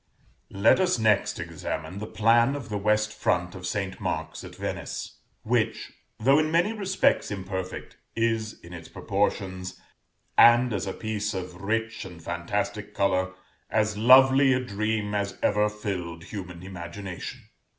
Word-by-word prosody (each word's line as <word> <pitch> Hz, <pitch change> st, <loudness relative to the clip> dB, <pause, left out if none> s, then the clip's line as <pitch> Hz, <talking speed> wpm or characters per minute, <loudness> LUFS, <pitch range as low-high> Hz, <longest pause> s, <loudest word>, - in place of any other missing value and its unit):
Let 100 Hz, -, +5 dB
us 185 Hz, -4 st, +2 dB
next 110 Hz, -3 st, +2 dB
examine 80 Hz, +5 st, -5 dB
the 110 Hz, -, -5 dB
plan 115 Hz, +5 st, +3 dB
of 135 Hz, -6 st, -7 dB
the 105 Hz, -, -2 dB
west 105 Hz, +1 st, +1 dB
front 90 Hz, -2 st, 0 dB
of 90 Hz, -1 st, -6 dB
St. 95 Hz, -3 st, -3 dB
Mark's -, -, -3 dB
at -, -, -10 dB
Venice, -, -, -5 dB, 0.2 s
which, -, -, 0 dB, 0.3 s
though 135 Hz, +6 st, +5 dB
in 155 Hz, 0 st, +1 dB
many 175 Hz, +7 st, +2 dB
respects 195 Hz, -3 st, +1 dB
imperfect, 95 Hz, -2 st, -5 dB, 0.2 s
is 115 Hz, -1 st, -1 dB
in 85 Hz, +1 st, -12 dB
its 85 Hz, -2 st, -9 dB
proportions, 95 Hz, -2 st, -2 dB, 0.6 s
and 120 Hz, 0 st, +7 dB
as 100 Hz, -1 st, -2 dB
a 95 Hz, -, -2 dB
piece 105 Hz, -1 st, -3 dB
of 90 Hz, -1 st, -6 dB
rich 115 Hz, +2 st, -1 dB
and 90 Hz, -3 st, -10 dB
fantastic 85 Hz, +1 st, -3 dB
color, 95 Hz, -1 st, +1 dB, 0.4 s
as 110 Hz, -1 st, +1 dB
lovely 130 Hz, +4 st, +7 dB
a 130 Hz, -, +2 dB
dream 110 Hz, -3 st, -2 dB
as 100 Hz, -1 st, -2 dB
ever 105 Hz, 0 st, +3 dB
filled 90 Hz, -6 st, -5 dB
human 90 Hz, -2 st, -8 dB
imagination. 95 Hz, 0 st, -7 dB
105 Hz, 145 wpm, -26 LUFS, 95-115 Hz, 0.6 s, and